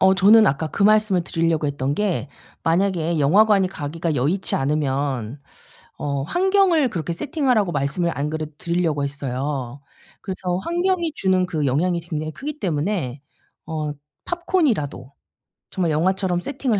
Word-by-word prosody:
어 190 0 +5
저는 210 +3 +6
아까 155 +3 0
그 200 - -2
말씀을 210 -4 +4
드리려고 165 -3 0
했던 140 -1 -1
게 195 -6 -1 0.3
만약에 170 -1 +1
영화관이 195 +6 +4
가기가 160 -1 -3
여의치 155 +10 0
않으면 135 -3 -1 0.6
어 140 -1 -2
환경을 365 - +3
그렇게 170 -3 -3
세팅하라고 250 - 0
말씀을 150 +4 0
안 145 +2 -1
그래도 155 -1 -4
드리려고 170 -4 0
했어요. 140 -1 -4 0.4
그래서 185 -2 -3
환경이 345 - 0
주는 185 -5 +1
그 155 -5 -1
영향이 170 +7 +1
굉장히 155 -2 -4
크기 295 - -6
때문에 155 - -2 0.5
어 155 -2 -3 0.3
팝콘이라도 275 - -1 0.6
정말 175 -4 0
영화처럼 180 +3 +1
세팅을 255 -3 -1
170 Hz, 330 characters per minute, -22 LUFS, 145-205 Hz, 0.6 s, 저는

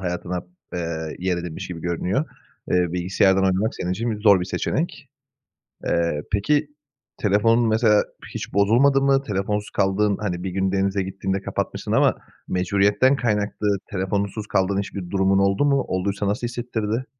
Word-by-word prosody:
hayatına, 90 0 -3 0.4
eee, 80 -2 -4
yer 90 0 0
edinmiş 85 -2 -6
gibi 85 -2 -6
görünüyor. 90 - -1 0.5
Eee, 90 -2 +2
bilgisayardan 95 +2 +2
oynamak 95 +4 +1
senin 90 - -3
için 115 +5 -2
bi 110 - -2
zor 100 -3 +6
bir - - -1
seçenek. 145 - -3 0.8
Eee, 85 -3 0
peki, 145 +9 +2 0.5
telefonun 115 +3 +3
mesela 110 -1 +4 0.3
hiç - - -6
bozulmadı 120 +8 +4
mı? 135 0 +3
Telefonsuz 105 -2 -2
kaldığın 100 +1 +1
hani, 90 -4 -2
bir 95 - -2
gün 95 +1 0
denize 95 0 +1
gittiğinde 95 0 -3
kapatmışsın - - -4
ama - - +4 0.3
mecburiyetten 100 +8 +2
kaynaklı 105 -4 0
telefonsuz 100 +2 -2
kaldığın 95 0 +1
hiçbir 95 -2 -5
durumun 95 0 +2
oldu 100 +7 +2
mu? 140 -2 +3
Olduysa 100 +2 -1
nasıl 120 +5 -1
hissettirdi? 120 -1 -3
100 Hz, 145 wpm, -23 LUFS, 95-110 Hz, 0.8 s, zor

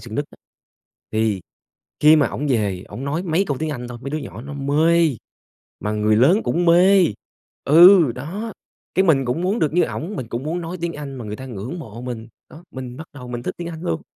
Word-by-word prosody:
Sơn 110 -2 -9
Nhất 145 - -1
á, - - -17 0.8
thì 110 -3 +1 0.6
khi 155 +1 +7
mà 150 - +3
ổng 150 - -4
về 100 -7 0
ổng 130 - -7
nói 150 +5 -2
mấy 180 +2 +1
câu 140 -3 -2
tiếng 160 0 -2
Anh 125 -4 -5
thôi, 120 -1 -8
mấy 140 - -5
đứa 155 - -2
nhỏ 120 -5 -8
nó 140 +2 -8
mê, 155 +4 +3 0.7
mà 105 - -2
người 105 0 +2
lớn 160 - +5
cũng 175 +1 0
mê. 180 +2 +6 0.6
Ừ, 170 -2 +7
đó, 190 - -5 0.4
cái 190 - +3
mình 145 -7 +3
cũng 125 +6 -1
muốn 195 +5 0
được 155 -7 +1
như 180 - +4
ổng, 180 +7 -3
mình 120 -8 -5
cũng 120 +2 -4
muốn 170 +3 -2
nói 170 +2 -5
tiếng 170 0 -2
Anh 145 -3 -7
mà 120 - -7
người 105 0 -5
ta 130 - -8
ngưỡng 125 - -6
mộ 115 -6 -9
mình, 120 -2 -6 0.2
đó, 160 - -13
mình 130 -2 -7
bắt 160 - -8
đầu 125 -3 -9
mình 120 -1 -5
thích - - -3
tiếng 170 -1 -5
Anh 165 -1 -8
luôn. 80 -1 -2
145 Hz, 235 wpm, -21 LUFS, 120-170 Hz, 0.8 s, khi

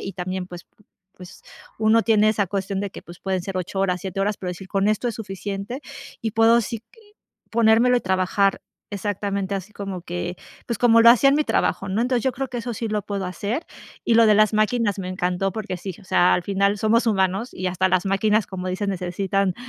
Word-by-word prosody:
y 195 - -5
también, 185 0 -4
pues 175 -1 -10 0.5
pues, 180 -1 -13 0.4
uno 220 +1 +4
tiene 215 -1 +4
esa 210 -2 +1
cuestión 195 0 -2
de 200 - -3
que, - - -10
pues, 175 0 -13
pueden 190 -1 -1
ser 190 0 -5
8 185 +2 -4
horas, 180 -2 0
7 195 +1 -4
horas, 205 +1 0
pero 180 - -5
decir: 185 +2 -9
"Con 195 0 +1
esto 215 +3 0
es 230 - -4
suficiente", 200 +4 -5 0.4
y 225 - -2
puedo, 225 +2 +4
sí, 230 +2 -4
q - - -56 0.6
ponérmelo 235 +2 +4
y - - +1
trabajar 190 +1 +1 0.3
exactamente 200 -1 -2
así, 195 +2 -6
como 195 -3 -6
que, 175 0 -4 0.3
pues, 235 - -2
como 230 0 +5
lo 235 - +8
hacía 250 +3 +7
en 275 - +4
mi 305 - +2
trabajo, 195 - 0
¿no? 195 +4 0
Entonces, 250 -1 0
yo 260 - +1
creo 270 +1 -4
que 245 - -6
eso 235 0 -4
sí 225 +1 -3
lo 210 -1 -1
puedo 200 -1 -4
hacer, 205 - -3 0.4
y 235 - +2
lo 230 0 +6
de 215 - +5
las 215 +1 +4
máquinas 215 -1 +1
me 185 - -4
encantó, 185 +1 -1
porque 215 -2 -4
sí, 185 0 -6
o 200 - -17
sea, 180 -1 +4
al 180 - 0
final 200 +1 +1
somos 230 +3 +2
humanos 195 +2 +1
y 185 0 -2
hasta 185 +1 +1
las 185 +1 +1
máquinas, 210 +2 +1
como 185 -1 -5
dicen, 190 +2 -2
necesitan 190 +1 -1
200 Hz, 220 wpm, -23 LUFS, 185-220 Hz, 0.6 s, lo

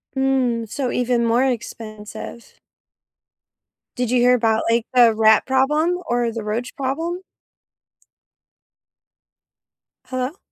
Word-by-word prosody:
Mm, 255 -4 0
so 255 +2 -2
even 245 -1 +1
more 235 +3 +2
expensive. 220 -2 -6 1.4
Did 245 -2 -2
you 250 - +3
hear 250 +1 +5
about, 225 -2 +1
like, 230 0 +2
the 240 -2 +6
rat 220 0 +4
problem, 300 +7 +2
or 240 -1 0
the 225 -1 -5
roach 225 +4 -4
problem? 325 +7 -3 2.8
Hello? 255 +6 -4
245 Hz, 105 wpm, -21 LUFS, 230-265 Hz, 2.8 s, the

